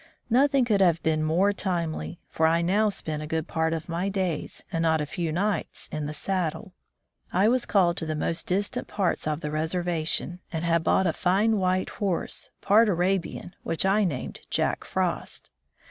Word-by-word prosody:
Nothing 270 Hz, +1 st, +4 dB
could 210 Hz, -4 st, +2 dB
have 170 Hz, -3 st, +3 dB
been 155 Hz, -1 st, +1 dB
more 175 Hz, +6 st, +2 dB
timely, 175 Hz, -4 st, -2 dB
for 160 Hz, -, +2 dB
I 165 Hz, +1 st, +2 dB
now 205 Hz, +5 st, +3 dB
spent 155 Hz, -6 st, -4 dB
a 155 Hz, -, -5 dB
good 160 Hz, +1 st, -2 dB
part 160 Hz, 0 st, 0 dB
of 165 Hz, -1 st, -3 dB
my 175 Hz, +3 st, -1 dB
days 185 Hz, -6 st, -2 dB
and 165 Hz, -, -1 dB
not 160 Hz, -1 st, +3 dB
a 150 Hz, -, -1 dB
few 165 Hz, +2 st, -3 dB
nights 190 Hz, +2 st, -1 dB
in 150 Hz, -1 st, -3 dB
the -, -, -4 dB
saddle. 180 Hz, +4 st, -2 dB, 0.6 s
I 190 Hz, +4 st, +3 dB
was 245 Hz, +1 st, +2 dB
called 175 Hz, -4 st, +3 dB
to 160 Hz, -, -2 dB
the 155 Hz, -, -1 dB
most 165 Hz, +2 st, -1 dB
distant 195 Hz, +3 st, -1 dB
parts 185 Hz, -5 st, -1 dB
of 155 Hz, +1 st, -1 dB
the 150 Hz, -, -3 dB
reservation, 165 Hz, +2 st, -1 dB
and 160 Hz, -1 st, -3 dB
had 170 Hz, -1 st, +2 dB
bought 190 Hz, -, +3 dB
a 165 Hz, -, +2 dB
fine 205 Hz, +7 st, +2 dB
white 185 Hz, -1 st, 0 dB
horse, 195 Hz, -5 st, -2 dB
part 215 Hz, +2 st, +5 dB
Arabian, 180 Hz, 0 st, -1 dB
which 165 Hz, -, -1 dB
I 200 Hz, +2 st, +3 dB
named 150 Hz, -10 st, -3 dB
''Jack -, -, 0 dB
Frost." -, -, -2 dB
175 Hz, 185 wpm, -26 LUFS, 160-195 Hz, 0.6 s, part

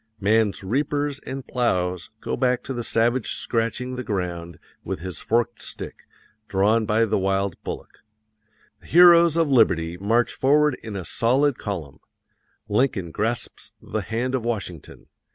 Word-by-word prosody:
Man's 105 Hz, 0 st, +2 dB
reapers 145 Hz, +6 st, -1 dB
and 135 Hz, 0 st, -5 dB
plows 90 Hz, -8 st, -1 dB
go -, -, -2 dB
back 125 Hz, -1 st, +1 dB
to 135 Hz, -, -5 dB
the 120 Hz, -1 st, -4 dB
savage 115 Hz, +2 st, +1 dB
scratching 125 Hz, +2 st, -2 dB
the 125 Hz, -, -3 dB
ground 90 Hz, -5 st, -4 dB, 0.3 s
with -, -, -4 dB
his 90 Hz, -2 st, -5 dB
forked 120 Hz, 0 st, 0 dB
stick, -, -, -7 dB, 0.4 s
drawn 105 Hz, +3 st, +2 dB
by 110 Hz, +2 st, +3 dB
the 110 Hz, -2 st, 0 dB
wild 95 Hz, -1 st, 0 dB
bullock. -, -, -7 dB, 0.8 s
The -, -, -18 dB
heroes 170 Hz, -1 st, +7 dB
of 165 Hz, -1 st, +3 dB
liberty 85 Hz, -9 st, +3 dB
march 115 Hz, +5 st, +1 dB
forward 150 Hz, +2 st, +3 dB
in 110 Hz, -2 st, -7 dB
a 95 Hz, -3 st, -5 dB
solid 130 Hz, -, +1 dB
column. 85 Hz, -10 st, -5 dB, 0.7 s
Lincoln 105 Hz, -5 st, 0 dB
grasps 115 Hz, +6 st, -3 dB
the -, -, -4 dB
hand 120 Hz, +3 st, -2 dB
of 130 Hz, -3 st, -1 dB
Washington. 100 Hz, -9 st, -5 dB
115 Hz, 145 wpm, -24 LUFS, 95-130 Hz, 0.8 s, heroes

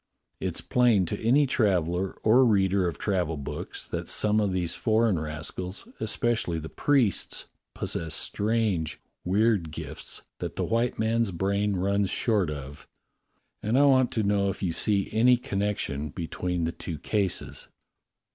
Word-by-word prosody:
It's -, -, -2 dB
plain 120 Hz, -7 st, +3 dB
to 105 Hz, +4 st, -4 dB
any 135 Hz, +6 st, +4 dB
traveller 95 Hz, -, +1 dB
or 120 Hz, +4 st, +6 dB
reader 100 Hz, -5 st, +3 dB
of 85 Hz, -, -4 dB
travel 90 Hz, -6 st, -1 dB
books 70 Hz, -, -6 dB
that -, -, -4 dB
some 105 Hz, 0 st, +3 dB
of 105 Hz, -2 st, +1 dB
these 90 Hz, -2 st, -1 dB
foreign 110 Hz, -5 st, +2 dB
rascals, 80 Hz, -, -5 dB
especially 110 Hz, -5 st, 0 dB
the 80 Hz, 0 st, -6 dB
priests, 130 Hz, -9 st, +1 dB, 0.3 s
possess 80 Hz, -1 st, -2 dB
strange, 105 Hz, -7 st, 0 dB, 0.2 s
weird 100 Hz, -2 st, +2 dB
gifts 75 Hz, -, -6 dB, 0.2 s
that -, -, -5 dB
the -, -, -1 dB
white 115 Hz, +1 st, 0 dB
man's 115 Hz, 0 st, +1 dB
brain 100 Hz, +3 st, 0 dB
runs 100 Hz, +1 st, +1 dB
short 105 Hz, -7 st, +1 dB
of, 70 Hz, -1 st, -8 dB, 0.7 s
and 110 Hz, +4 st, +1 dB
I 140 Hz, -, +6 dB
want 130 Hz, -3 st, +4 dB
to 110 Hz, -, 0 dB
know 100 Hz, -1 st, +2 dB
if 95 Hz, -, -5 dB
you 85 Hz, -3 st, 0 dB
see 100 Hz, +2 st, +2 dB
any 120 Hz, +3 st, +5 dB
con 100 Hz, -5 st, -4 dB
nection 75 Hz, -8 st, -2 dB
between 90 Hz, +1 st, -3 dB
the 80 Hz, -, 0 dB
two 85 Hz, -1 st, -6 dB
cases." 95 Hz, +4 st, -2 dB
100 Hz, 150 wpm, -27 LUFS, 90-110 Hz, 0.7 s, or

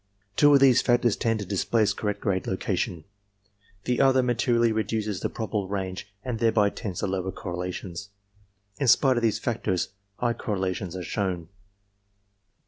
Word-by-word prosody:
Two 145 Hz, +5 st, +6 dB
of -, -, +6 dB
these 130 Hz, -3 st, +6 dB
factors 120 Hz, -3 st, +3 dB
tend 115 Hz, -2 st, 0 dB
to -, -, -4 dB
displace 105 Hz, +3 st, +1 dB
correct 105 Hz, -1 st, -3 dB
grade 95 Hz, -2 st, -1 dB
location. 95 Hz, -2 st, -2 dB, 0.8 s
The 125 Hz, +1 st, +1 dB
other 130 Hz, -1 st, +4 dB
materially 120 Hz, -1 st, +2 dB
reduces 110 Hz, -2 st, -1 dB
the -, -, -2 dB
probable 105 Hz, -3 st, -3 dB
range 95 Hz, 0 st, -4 dB
and 120 Hz, -3 st, -3 dB
thereby 110 Hz, -3 st, +3 dB
tends 95 Hz, -3 st, -5 dB
to -, -, 0 dB
lower 95 Hz, -1 st, -2 dB
correlations. 90 Hz, +1 st, -5 dB, 0.7 s
In 140 Hz, -, 0 dB
spite 130 Hz, +1 st, +5 dB
of -, -, +1 dB
these 115 Hz, -3 st, +2 dB
factors, 105 Hz, -6 st, -1 dB, 0.3 s
high 120 Hz, +1 st, 0 dB
correlations 95 Hz, -5 st, -3 dB
are 90 Hz, -, -4 dB
shown. 90 Hz, -2 st, -2 dB
105 Hz, 150 wpm, -26 LUFS, 95-120 Hz, 0.8 s, Two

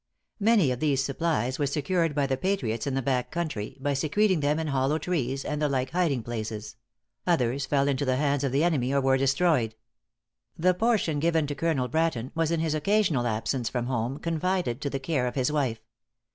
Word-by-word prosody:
Many 205 Hz, -, +4 dB
of 125 Hz, -, -3 dB
these 140 Hz, -3 st, +1 dB
supplies 140 Hz, -3 st, -1 dB
were 145 Hz, -, +1 dB
secured 155 Hz, +3 st, 0 dB
by 145 Hz, -2 st, +2 dB
the 135 Hz, -1 st, 0 dB
patriots 130 Hz, -, -1 dB
in 135 Hz, -, -1 dB
the 135 Hz, -, -1 dB
back 125 Hz, -1 st, 0 dB
country, 155 Hz, -12 st, -4 dB
by 140 Hz, +1 st, 0 dB
secreting 175 Hz, +7 st, +2 dB
them 145 Hz, +1 st, +1 dB
in 160 Hz, -, -2 dB
hollow 135 Hz, +2 st, +1 dB
trees 135 Hz, -6 st, -2 dB
and 150 Hz, 0 st, -2 dB
the 150 Hz, -, +2 dB
like 130 Hz, -1 st, -1 dB
hiding 165 Hz, -9 st, +1 dB
places; 110 Hz, -2 st, -5 dB, 0.5 s
others 130 Hz, -4 st, +1 dB
fell 140 Hz, -1 st, +2 dB
into 140 Hz, 0 st, 0 dB
the 130 Hz, -2 st, +1 dB
hands 145 Hz, 0 st, +1 dB
of 135 Hz, -, 0 dB
the 140 Hz, +4 st, +2 dB
enemy 140 Hz, -7 st, +1 dB
or 140 Hz, -, +3 dB
were 135 Hz, 0 st, +3 dB
destroyed. 135 Hz, -4 st, +2 dB, 0.8 s
The 180 Hz, +3 st, +3 dB
portion 185 Hz, -7 st, +1 dB
given 165 Hz, 0 st, +2 dB
to 145 Hz, -, -3 dB
Colonel 140 Hz, -3 st, 0 dB
Bratton 155 Hz, -5 st, -1 dB
was 165 Hz, -1 st, 0 dB
in 165 Hz, -1 st, 0 dB
his 160 Hz, -2 st, 0 dB
occasional 155 Hz, -, +1 dB
absence 115 Hz, +2 st, -1 dB
from 120 Hz, -2 st, -2 dB
home 120 Hz, +1 st, -2 dB
confided 165 Hz, -5 st, -1 dB
to 140 Hz, -, -1 dB
the 135 Hz, -, -3 dB
care 135 Hz, -3 st, -1 dB
of 125 Hz, -, -4 dB
his 130 Hz, +1 st, +1 dB
wife. 130 Hz, -7 st, 0 dB
140 Hz, 200 wpm, -27 LUFS, 130-165 Hz, 0.8 s, Many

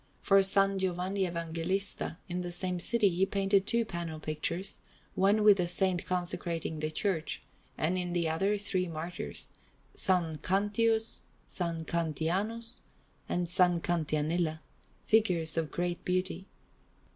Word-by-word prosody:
For 195 Hz, -, +5 dB
S. 195 Hz, 0 st, +5 dB, 0.2 s
Giovanni 190 Hz, +1 st, 0 dB
Evangelista, 170 Hz, +2 st, -2 dB
in 180 Hz, 0 st, -3 dB
the 175 Hz, 0 st, -4 dB
same 180 Hz, 0 st, -1 dB
city, 230 Hz, +3 st, +3 dB
he 185 Hz, 0 st, +1 dB
painted 195 Hz, 0 st, +2 dB
two 235 Hz, -1 st, +2 dB
panel 170 Hz, -5 st, -5 dB
pictures, 165 Hz, +5 st, -3 dB, 0.3 s
one 205 Hz, +3 st, +3 dB
with 210 Hz, -2 st, +7 dB
that 180 Hz, -2 st, +1 dB
Saint 180 Hz, 0 st, +1 dB
consecrating 175 Hz, -3 st, -2 dB
the 155 Hz, 0 st, -1 dB
church, 165 Hz, 0 st, -2 dB, 0.3 s
and 175 Hz, +4 st, +1 dB
in 175 Hz, -1 st, -3 dB
the 170 Hz, -2 st, +1 dB
other 195 Hz, +6 st, +1 dB
three 190 Hz, -3 st, -1 dB
martyrs, 165 Hz, +2 st, -5 dB, 0.4 s
S. -, -, -6 dB, 0.3 s
Cantius, 220 Hz, +4 st, +1 dB, 0.3 s
S. 170 Hz, -2 st, -2 dB
Cantianus, 185 Hz, -, -2 dB, 0.5 s
and 175 Hz, -, 0 dB
S. 175 Hz, 0 st, -2 dB, 0.3 s
Cantianilla, 160 Hz, 0 st, 0 dB, 0.4 s
figures 180 Hz, -8 st, +3 dB
of 165 Hz, -2 st, 0 dB
great 175 Hz, 0 st, -2 dB
beauty. 185 Hz, +1 st, -1 dB
180 Hz, 130 wpm, -31 LUFS, 165-195 Hz, 0.5 s, with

